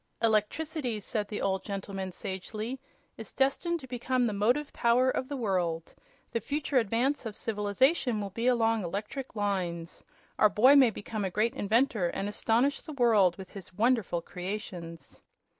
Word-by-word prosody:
"Electricity," 230 +3 0
said 210 +1 -2
the 210 - -4
old 190 -1 0
gentleman, 195 -1 -5
sagely, 215 +8 -5 0.4
"is 225 - -7
destined 305 +6 0
to 270 - -10
become 250 0 0
the 220 - 0
motive 245 +9 +1
power 245 +2 +3
of 260 - -2
the 285 - -3
world. 180 -8 -1 0.4
The 230 - 0
future 285 +2 0
advance 240 +6 0
of 220 -3 -6
civilization 225 - +1
will 200 -1 -4
be 230 +5 -2
along 225 -3 +3
electrical 210 +7 -5
lines. 180 -5 -2 0.4
Our 215 - +6
boy 250 +8 +6
may 265 -4 +7
become 215 0 -5
a 190 - 0
great 215 +5 +1
inventor 220 -2 +2
and 195 +3 -3
astonish 235 +6 +1
the 310 - -8
world 215 -9 +4
with 190 -1 -10
his 195 -2 -10
wonderful 220 -6 +1
creations." 180 -3 -7
220 Hz, 160 wpm, -29 LUFS, 195-255 Hz, 0.4 s, may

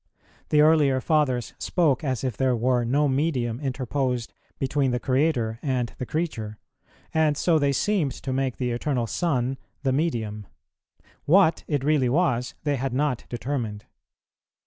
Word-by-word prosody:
The 150 - +4
earlier 150 -4 +4
Fathers 130 -4 +1
spoke 155 -7 +1
as 130 -4 -2
if 130 -5 -2
there 130 0 +1
were 120 +1 +1
no 140 +5 +2
medium 130 -4 0
interposed 130 -2 -2 0.2
between 135 0 0
the 125 0 0
Creator 130 -4 0
and 130 -5 -1
the 125 - -4
creature, 115 -10 -3 0.6
and 155 -2 +2
so 165 -1 +3
they 140 -1 +2
seemed 160 0 +1
to 130 - -5
make 130 -1 -1
the 125 -2 -1
Eternal 120 0 -1
Son 130 -2 -1 0.2
the 135 -2 +1
medium; 110 - -2 0.8
what 170 0 +4
it 145 -4 -1
really 145 -4 +2
was, 125 -5 +1
they 145 -2 0
had 130 0 -2
not 140 -3 0
determined. 120 -5 -4
135 Hz, 145 wpm, -25 LUFS, 125-150 Hz, 0.8 s, The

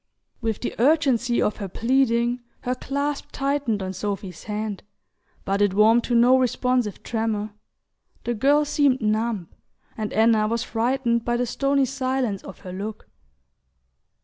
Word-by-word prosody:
With 225 -3 -2
the - - -3
urgency 260 -3 +3
of 210 - 0
her 200 - -4
pleading 240 +2 +1 0.2
her 250 - -1
clasp 280 +3 -3
tightened 275 -7 -1
on 185 0 -4
Sophy's 195 -2 -5
hand, 210 -1 -3 0.6
but 195 +1 0
it 200 -2 +2
warmed 225 +3 +5
to 245 - 0
no 245 +2 +6
responsive 250 -3 0
tremor: 220 -2 -2 0.7
the 240 - -1
girl 285 +6 +3
seemed 280 -3 +2
numb, 215 -4 -1 0.5
and 215 -1 -4
Anna 220 -1 +3
was 230 +1 -1
frightened 235 0 0
by 240 0 0
the 245 - 0
stony 275 +3 +1
silence 260 -5 -1
of 195 - -11
her 180 - -8
look. 210 +3 -6
235 Hz, 145 wpm, -24 LUFS, 215-260 Hz, 0.7 s, no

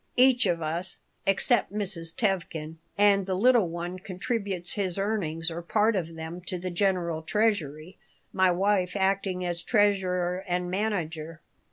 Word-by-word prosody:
Each 255 -1 +5
of 170 -2 0
us, 165 +4 -2 0.3
except 195 +4 +2
Mrs. 185 -5 -3
Tevkin 170 -6 -2 0.2
and 200 -1 +4
the 190 - 0
little 230 -2 +4
one 175 +2 -5
contributes 190 -1 -2
his 190 -4 -1
earnings 175 -6 -1
or 170 +1 -5
part 215 +5 +2
of 165 -3 -3
them 160 +2 -6
to 185 - -2
the 180 +1 -4
general 175 -3 0
treasury, 175 -4 -1 0.3
my 185 -1 +4
wife 185 0 +1
acting 190 -1 0
as 175 -1 -2
treasurer 185 -4 +1
and 180 0 -1
manager. 165 -6 -2
185 Hz, 145 wpm, -27 LUFS, 170-200 Hz, 0.3 s, Each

